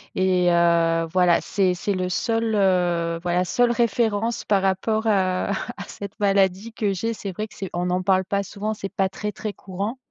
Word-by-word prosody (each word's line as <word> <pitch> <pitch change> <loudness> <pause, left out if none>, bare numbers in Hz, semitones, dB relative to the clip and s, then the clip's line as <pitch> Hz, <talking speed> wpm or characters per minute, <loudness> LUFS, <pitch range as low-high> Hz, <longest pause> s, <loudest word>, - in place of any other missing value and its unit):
et 185 -1 +2
heu, 170 -1 +3
voilà 180 -2 +4
c'est 190 -3 +1
c'est 180 +3 -3
le 185 -1 -1
seul, 225 +4 0
heu 175 -4 +1
voilà 180 0 +1
seule 240 +6 +2
référence 230 -1 0
par 200 -2 +2
rapport 215 +4 0
à 185 -2 +1
à 245 +5 -4
cette 200 -1 -8
maladie 195 +2 +2
que 210 -3 -1
j'ai. 225 +5 -2
C'est 200 -3 -6
vrai 215 +4 -4
que - - -19
c'est 195 - -5
on 175 +1 -1
en 180 +1 0
parle 190 0 +2
pas 200 +2 -1
souvent, 210 +3 -4
c'est 195 -2 -5
pas 190 -1 -1
très 210 +1 -5
très 215 - -4
courant. 200 +5 -5
195 Hz, 195 wpm, -23 LUFS, 180-215 Hz, -, voilà